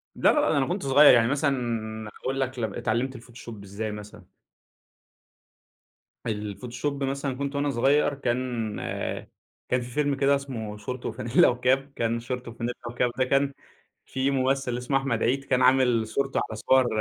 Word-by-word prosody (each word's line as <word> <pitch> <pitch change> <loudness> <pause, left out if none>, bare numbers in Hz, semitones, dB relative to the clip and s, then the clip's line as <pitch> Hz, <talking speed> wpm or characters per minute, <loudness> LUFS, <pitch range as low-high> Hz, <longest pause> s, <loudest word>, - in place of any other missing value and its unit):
لا، - - +4
لا، 300 - +4
لا - - +2
ده 150 - +2
أنا 135 - +2
كنت 185 0 -2
صغير، 140 +1 +8
يعني 115 -1 +5
مثلًا 120 -6 -1
هاقول 135 +1 -2
لك 130 -1 -2
ل 110 -4 -2
اتعلمت 125 +4 -1
الفوتوشوب 115 -3 -10
إزاي 105 +2 -4
مثلًا. 105 -2 -10 2.0
الفوتوشوب 120 +6 -3
مثلًا 135 -1 -2
كنت 140 0 -3
وأنا 145 0 +1
صغير 140 +3 +3
كان 120 -4 -2 0.9
كان 125 0 +2
في 120 - -7
فيلم 145 +1 +1
كده 140 +1 +3
اسمه 115 -7 -5
شورت 125 +4 -6
وفانلة 120 +2 +3
وكاب، 130 +3 +1
كان 115 0 0
شورت 125 +1 -5
وفانلة 120 +1 -4 0.2
وكاب 120 0 0
ده 130 - +3
كان 140 +1 +2 0.5
فيه 130 +1 -1
ممثل 130 -2 0
اسمه 130 +2 0
أحمد 135 -4 -1
عيد 135 +4 +1
كان 130 -1 +1
عامل 125 -3 +4
صورته 135 +4 -1
على 110 - -5
صور 130 +3 +3
125 Hz, 160 wpm, -26 LUFS, 115-135 Hz, 2.0 s, صغير